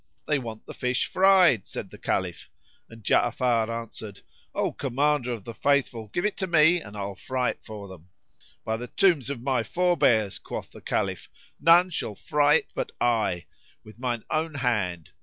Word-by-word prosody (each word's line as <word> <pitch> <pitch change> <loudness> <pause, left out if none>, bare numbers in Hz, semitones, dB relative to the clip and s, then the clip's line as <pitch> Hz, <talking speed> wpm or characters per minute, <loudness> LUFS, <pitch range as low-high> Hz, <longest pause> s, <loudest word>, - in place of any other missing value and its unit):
"They 150 -2 +2
want 115 -3 -8
the - - -9
fish 125 0 0
fried," 185 - +4
said - - -7
the - - -12
Caliph, - - -2 0.4
and 115 -1 -13
Ja'afar 115 +1 +2
answered, 115 -3 -6 0.3
"O - - 0
Commander 140 -1 0
of 115 -5 -5
the 115 - -7
Faithful, 130 -5 +1
give 175 - -2
it 210 - -1
to 190 - -2
me 170 +1 +5
and 105 -4 -10
I'll 100 0 -4
fry 125 +5 -1
it - - -14
for 105 -3 -8
them." 90 -2 -13 0.6
"By 110 0 -1
the 120 +2 -6
tombs 170 - +2
of 130 -4 -5
my 130 -3 +1
forbears," 115 - +2
quoth - - -7
the - - -13
Caliph, - - -2 0.3
"none 175 +3 +6
shall 110 -9 -3
fry 150 +4 +3
it - - 0
but - - -3
I, 110 -8 +1 0.4
with 110 +2 -15
mine 120 -3 -2
own 155 0 -1
hand!" 105 - -1
125 Hz, 175 wpm, -26 LUFS, 110-150 Hz, 0.6 s, none